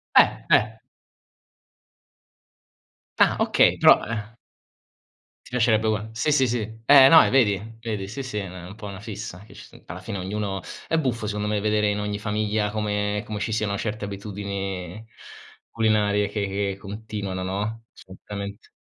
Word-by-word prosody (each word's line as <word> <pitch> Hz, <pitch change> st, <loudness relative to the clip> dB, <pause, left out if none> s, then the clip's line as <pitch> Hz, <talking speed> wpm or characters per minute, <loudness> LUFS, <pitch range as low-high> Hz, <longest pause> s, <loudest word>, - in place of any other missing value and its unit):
Eh, -, -, +5 dB
eh. 110 Hz, +1 st, +3 dB, 2.4 s
Ah, -, -, +5 dB
okay, -, -, +4 dB
però, -, -, +6 dB
eh 110 Hz, 0 st, -5 dB, 1.1 s
Ti -, -, -14 dB
piacerebbe 110 Hz, -3 st, +2 dB
ugua 110 Hz, 0 st, -1 dB
sì, 115 Hz, +7 st, 0 dB
sì, 135 Hz, -2 st, +4 dB
sì, 120 Hz, 0 st, 0 dB, 0.3 s
eh, 135 Hz, 0 st, +9 dB
no, 160 Hz, +3 st, +9 dB
eh, -, -, +1 dB
vedi, 110 Hz, -3 st, +1 dB
vedi, 110 Hz, -4 st, -4 dB
sì, 125 Hz, +7 st, -5 dB
sì, 130 Hz, -5 st, -5 dB
è 100 Hz, -2 st, -3 dB
na 90 Hz, -1 st, -9 dB
un 100 Hz, -, -10 dB
po' 105 Hz, -, -8 dB
una 100 Hz, -2 st, -8 dB
fissa 105 Hz, -3 st, -7 dB
che -, -, -16 dB
ci -, -, -12 dB
s -, -, -16 dB
alla 90 Hz, +3 st, -8 dB
fine 100 Hz, +2 st, -5 dB
ognuno 95 Hz, +1 st, -3 dB, 0.3 s
è 165 Hz, -, +2 dB
buffo 125 Hz, -7 st, -1 dB
secondo 105 Hz, 0 st, -2 dB
me 105 Hz, -1 st, 0 dB
vedere 105 Hz, 0 st, +2 dB
in 105 Hz, 0 st, -1 dB
ogni 105 Hz, 0 st, -3 dB
famiglia 105 Hz, 0 st, -1 dB
come 105 Hz, -1 st, -1 dB
come 105 Hz, -1 st, -5 dB
ci 110 Hz, +2 st, -2 dB
siano 105 Hz, -2 st, -1 dB
certe 105 Hz, +1 st, -4 dB
abitudini 100 Hz, -1 st, -5 dB, 0.6 s
culinarie 105 Hz, -2 st, +2 dB
che 105 Hz, 0 st, -2 dB
che 100 Hz, 0 st, -2 dB
continuano, 100 Hz, -2 st, -5 dB
no? 105 Hz, +4 st, -3 dB
Assolutamente. 100 Hz, +2 st, -9 dB
105 Hz, 165 wpm, -24 LUFS, 100-110 Hz, 2.4 s, eh